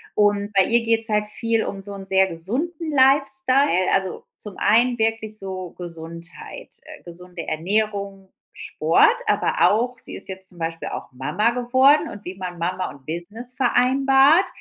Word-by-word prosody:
und 205 Hz, 0 st, +2 dB
bei 195 Hz, -1 st, +5 dB
ihr 235 Hz, 0 st, +2 dB
geht's 225 Hz, -1 st, +2 dB
halt 210 Hz, 0 st, +1 dB
viel 230 Hz, -1 st, +1 dB
um 195 Hz, -1 st, -5 dB
so 200 Hz, +1 st, -6 dB
'n 195 Hz, -1 st, -9 dB
sehr 190 Hz, 0 st, +3 dB
gesunden 280 Hz, -, -3 dB
Lifestyle, 270 Hz, -5 st, +3 dB
also, 190 Hz, -1 st, -1 dB
zum 210 Hz, -3 st, -8 dB
einen 240 Hz, +3 st, +3 dB
wirklich 220 Hz, -1 st, -1 dB
so 185 Hz, -2 st, -6 dB
Gesundheit 170 Hz, 0 st, -9 dB
äh, 310 Hz, -1 st, -12 dB
gesunde 175 Hz, 0 st, -9 dB
Ernährung, 200 Hz, +3 st, -2 dB, 0.2 s
Sport, 165 Hz, -, +2 dB
aber -, -, +3 dB
auch 245 Hz, +4 st, 0 dB
sie -, -, -8 dB
ist -, -, -5 dB
jetzt 190 Hz, 0 st, -6 dB
zum 175 Hz, -, -13 dB
Beispiel 165 Hz, 0 st, -4 dB
auch -, -, -7 dB
Mama 135 Hz, -, 0 dB
geworden 260 Hz, +4 st, +3 dB
und 205 Hz, 0 st, -10 dB
wie 180 Hz, -, -6 dB
man 180 Hz, -2 st, -6 dB
Mama 185 Hz, +2 st, -2 dB
und 140 Hz, -2 st, -16 dB
Business 205 Hz, +10 st, -6 dB
vereinbart 270 Hz, +5 st, +4 dB
205 Hz, 160 wpm, -22 LUFS, 185-250 Hz, 0.2 s, bei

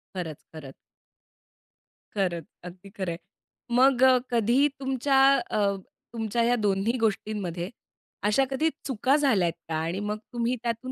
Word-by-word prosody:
खरंच, 160 Hz, -5 st, -4 dB, 0.2 s
खरंच. 140 Hz, -4 st, -9 dB, 1.4 s
खरंच, 180 Hz, -5 st, -1 dB, 0.2 s
अगदी 180 Hz, +2 st, -11 dB
खरं 190 Hz, -3 st, -4 dB
आहे. 165 Hz, -, -5 dB, 0.6 s
मग 260 Hz, 0 st, +5 dB
अ, 260 Hz, -1 st, +7 dB
कधी 240 Hz, +5 st, +3 dB
तुमच्या 270 Hz, 0 st, +1 dB, 0.3 s
अ, 200 Hz, -2 st, +1 dB, 0.4 s
तुमच्या 225 Hz, 0 st, -1 dB
ह्या 240 Hz, +1 st, +3 dB
दोन्ही 210 Hz, +2 st, 0 dB
गोष्टींमध्ये 200 Hz, -5 st, -2 dB, 0.6 s
अशा 210 Hz, +6 st, +3 dB
कधी 310 Hz, +5 st, +1 dB, 0.2 s
चुका 265 Hz, +2 st, +2 dB
झाल्यात 215 Hz, -, +2 dB, 0.2 s
का 160 Hz, -, -1 dB
आणि 165 Hz, +4 st, -2 dB
मग 210 Hz, +1 st, -2 dB, 0.2 s
तुम्ही 240 Hz, +1 st, 0 dB
त्यातून 235 Hz, +2 st, -3 dB
215 Hz, 130 wpm, -26 LUFS, 185-255 Hz, 1.4 s, अ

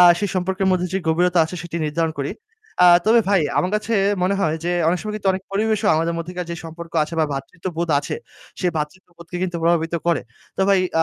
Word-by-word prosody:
আ -, -, +9 dB, 0.2 s
সেই 205 Hz, -2 st, -1 dB
সম্পর্কের 190 Hz, +1 st, 0 dB
মধ্যে 180 Hz, 0 st, +1 dB
যে 190 Hz, -, +1 dB
গভীরতা 175 Hz, +2 st, +2 dB
আছে 160 Hz, +3 st, -6 dB
সেটি 170 Hz, 0 st, -6 dB
নির্ধারণ 160 Hz, +1 st, -1 dB
করি। 140 Hz, -, -2 dB, 0.5 s
আ -, -, +9 dB, 0.2 s
তবে 230 Hz, +1 st, +6 dB
ভাই 195 Hz, -3 st, +4 dB, 0.2 s
আমার 180 Hz, -, +1 dB
কাছে 220 Hz, +2 st, -4 dB, 0.3 s
মনে 190 Hz, +2 st, +2 dB
হয় 160 Hz, -3 st, +1 dB
যে 175 Hz, -, 0 dB, 0.2 s
অনেক 180 Hz, +1 st, +1 dB
সময় 215 Hz, 0 st, -5 dB
কিন্তু 200 Hz, -2 st, -1 dB
অনেক 185 Hz, 0 st, -4 dB
পরিবেশও 215 Hz, +1 st, +1 dB
আমাদের 165 Hz, +1 st, 0 dB
মধ্যেকার 175 Hz, +1 st, -5 dB
যে 170 Hz, -, -3 dB
সম্পর্ক 165 Hz, +1 st, -9 dB
আছে 160 Hz, -, -8 dB
বা -, -, +4 dB
ভ্রাতৃত্ববোধ 165 Hz, +5 st, -4 dB
আছে, -, -, -4 dB, 0.5 s
সে 185 Hz, -, 0 dB
ভ্রাতৃত্ববোধকে 170 Hz, +2 st, -6 dB
কিন্তু 175 Hz, -2 st, -2 dB
প্রভাবিত 165 Hz, 0 st, +2 dB
করে। 170 Hz, -6 st, +2 dB, 0.4 s
তো -, -, -2 dB
ভাই, 195 Hz, -1 st, +5 dB, 0.2 s
আ -, -, +6 dB
175 Hz, 210 wpm, -21 LUFS, 165-190 Hz, 0.5 s, আ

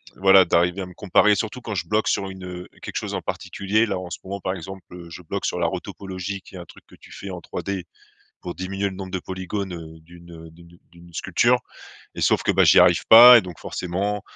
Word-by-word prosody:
voilà 95 Hz, 0 st, +6 dB
d'arriver 90 Hz, +3 st, +1 dB
à -, -, -4 dB
me 90 Hz, -, -13 dB
comparer, 105 Hz, +1 st, +3 dB
surtout 110 Hz, +5 st, -4 dB
quand 110 Hz, -3 st, -5 dB
je 90 Hz, -, -3 dB
bloque 105 Hz, +1 st, 0 dB
sur 95 Hz, -, 0 dB
une, 95 Hz, -1 st, -11 dB
heu, 90 Hz, 0 st, -8 dB
quelque -, -, -8 dB
chose -, -, -4 dB
en -, -, -3 dB
particulier. 105 Hz, +3 st, -1 dB
Là 95 Hz, -4 st, -3 dB
en 90 Hz, -1 st, -8 dB
ce 85 Hz, -, -6 dB
moment 100 Hz, +1 st, -6 dB
par 95 Hz, 0 st, -3 dB
exemple, 95 Hz, +2 st, -9 dB
heu, 85 Hz, -1 st, -11 dB
je 90 Hz, -, -9 dB
bloque 95 Hz, +4 st, -5 dB
sur 90 Hz, -, -2 dB
la 85 Hz, -, +1 dB
retopologie, 95 Hz, +2 st, -6 dB
qui 95 Hz, -, -16 dB
est -, -, -7 dB
un 85 Hz, -, -9 dB
truc -, -, -17 dB
que -, -, -17 dB
tu -, -, -18 dB
fais 100 Hz, -, -9 dB
en 90 Hz, -2 st, -6 dB
3D 95 Hz, +1 st, -5 dB, 0.6 s
pour 90 Hz, -, -7 dB
diminuer 95 Hz, +2 st, -3 dB
le 95 Hz, -, -9 dB
nombre 95 Hz, -1 st, -8 dB
de 95 Hz, -, -1 dB
polygones, 95 Hz, +1 st, -5 dB
heu, 80 Hz, -1 st, -10 dB
d'une, 85 Hz, +1 st, -16 dB
heu, 80 Hz, 0 st, -12 dB
d'une 85 Hz, +1 st, -18 dB
d’une 85 Hz, 0 st, -17 dB
sculpture, 120 Hz, +8 st, +1 dB, 0.6 s
et -, -, -5 dB
sauf -, -, +2 dB
que, -, -, +1 dB
bah, -, -, +4 dB
j'y -, -, +6 dB
arrive 90 Hz, -1 st, +5 dB
pas 120 Hz, +2 st, +11 dB
et -, -, +2 dB
donc 90 Hz, -3 st, -10 dB
forcément, 100 Hz, +3 st, -3 dB
95 Hz, 245 wpm, -22 LUFS, 85-100 Hz, 0.6 s, pas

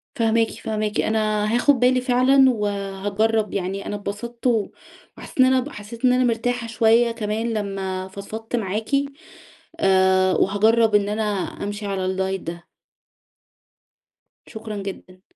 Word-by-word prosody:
فاهماكِ، 225 Hz, -2 st, +2 dB
فاهماكِ. 215 Hz, -1 st, -3 dB
أنا 215 Hz, -1 st, 0 dB
هاخد 265 Hz, +2 st, +3 dB
بالي 250 Hz, +1 st, +3 dB
فعلًا، 260 Hz, +2 st, +4 dB
وهاجرب 205 Hz, 0 st, -1 dB
يعني. 195 Hz, +1 st, -3 dB
أنا 205 Hz, -, -4 dB
انبسطت 230 Hz, +5 st, -5 dB
و 225 Hz, -4 st, +1 dB, 0.5 s
وحسيت -, -, -12 dB
إن 260 Hz, -, +8 dB
أنا 260 Hz, +3 st, 0 dB
حسيت 225 Hz, +4 st, -6 dB
إن 250 Hz, -, +5 dB
أنا 255 Hz, 0 st, +3 dB
مرتاحة 240 Hz, 0 st, -1 dB
شوية 230 Hz, +1 st, +3 dB
كمان 225 Hz, 0 st, -2 dB
لمَّا 195 Hz, -3 st, -3 dB
فضفضت 215 Hz, +4 st, -6 dB
معاكِ. 215 Hz, -1 st, -3 dB, 0.9 s
آآ، 190 Hz, -1 st, +4 dB
وهاجرب 220 Hz, +3 st, +3 dB
إن 205 Hz, -1 st, +3 dB
أنا 210 Hz, +1 st, -1 dB, 0.4 s
أمشي 205 Hz, +1 st, -5 dB
على 195 Hz, -2 st, -2 dB
الدايت 190 Hz, 0 st, -1 dB
ده. 170 Hz, +1 st, -8 dB, 1.8 s
شكرًَا 220 Hz, -1 st, -7 dB
جدًا. 185 Hz, -1 st, -9 dB
215 Hz, 130 wpm, -22 LUFS, 195-235 Hz, 1.8 s, إن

